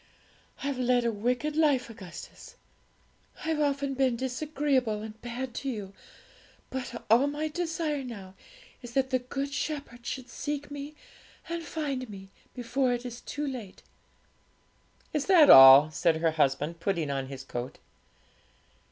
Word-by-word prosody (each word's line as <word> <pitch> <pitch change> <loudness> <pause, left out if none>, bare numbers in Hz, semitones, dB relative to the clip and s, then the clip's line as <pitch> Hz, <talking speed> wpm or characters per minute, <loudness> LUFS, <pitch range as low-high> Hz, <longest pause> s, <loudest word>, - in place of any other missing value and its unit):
I've 280 -2 -2
led 250 -1 +2
a 235 - +2
wicked 245 +8 -1
life, 295 -5 +3
Augustus; 185 -7 -11 0.9
I've 320 -1 0
often 280 -1 0
been 260 -2 +1
disagreeable 260 -3 -1
and 220 0 -9
bad 245 +1 -5
to 275 - -3
you; 205 -6 -5 0.8
but 250 -2 -5
all 235 +6 +5
my 300 +2 -2
desire 325 -3 -2
now 200 -7 -9 0.5
is 240 -1 -10
that 265 0 +1
the 255 - +2
Good 275 +3 -4
Shepherd 280 -6 -4
should 255 +1 -5
seek 290 0 -5
me 290 +1 -7 0.5
and 335 0 -3
find 280 -6 -4
me, 195 -1 -11 0.2
before 245 +1 0
it 245 +1 -4
is 240 0 -7
too 295 +1 -4
late.' 245 -9 -7 1.3
'Is 300 -2 -1
that 350 -6 +8
all?' 135 +3 +10
said 165 +1 +2
her 165 0 +1
husband, 150 +2 0
putting 165 -5 -1
on 135 -1 -2
his 135 -1 -8
coat. 120 -1 -6
250 Hz, 145 wpm, -28 LUFS, 210-285 Hz, 1.3 s, all